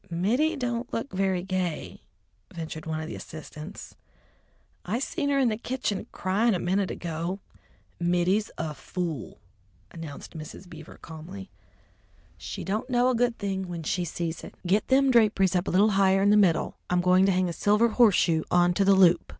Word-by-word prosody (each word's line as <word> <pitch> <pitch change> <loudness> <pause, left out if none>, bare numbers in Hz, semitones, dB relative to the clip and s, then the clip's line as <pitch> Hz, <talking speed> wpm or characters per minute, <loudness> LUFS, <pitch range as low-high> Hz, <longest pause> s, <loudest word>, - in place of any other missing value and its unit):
"Mittie 235 - +1
don't 245 -3 -3
look 230 +5 -4
very 190 -1 0
gay," 185 -4 -3 0.5
ventured 160 -1 -7
one 160 0 -2
of 160 - -5
the - - -6
assistants. 155 +3 -9 0.9
"I 210 +6 -2
seen 285 +2 -2
her 280 - +2
in 260 -3 +3
the 215 - -2
kitchen 240 -5 -3
cryin' 205 +4 +1
a - - -1
minute 190 +2 0
ago." 170 +3 -4 0.6
"Mittie's 180 +4 +1
a 160 -2 -3
fool!" 165 -2 -5 0.5
announced 165 -3 -9
Mrs. 155 +4 -9
Beaver 160 -2 -12
calmly. 175 +5 -9 0.8
"She - - -7
don't 215 +6 -3
know 245 0 +3
a 255 - +1
good 240 0 +1
thing 190 -2 -3
when 170 -2 -6
she 175 +3 -1
sees 170 0 -4
it! - - -10
Get 200 +4 +2
them 270 0 +4
draperies 210 -6 +3
up 180 +1 0
a - - +1
little 205 +4 +4
higher 195 -1 +3
in 205 - +4
the - - +6
middle; 190 -6 +2
I'm 180 0 +2
going 185 +2 +4
to - - +4
hang 185 0 +1
a 170 - -3
silver 210 +6 +3
horseshoe 200 -8 +4
on 175 0 +4
to 195 - +2
the 195 0 +5
loop." 180 -3 +4
190 Hz, 180 wpm, -27 LUFS, 170-215 Hz, 0.9 s, the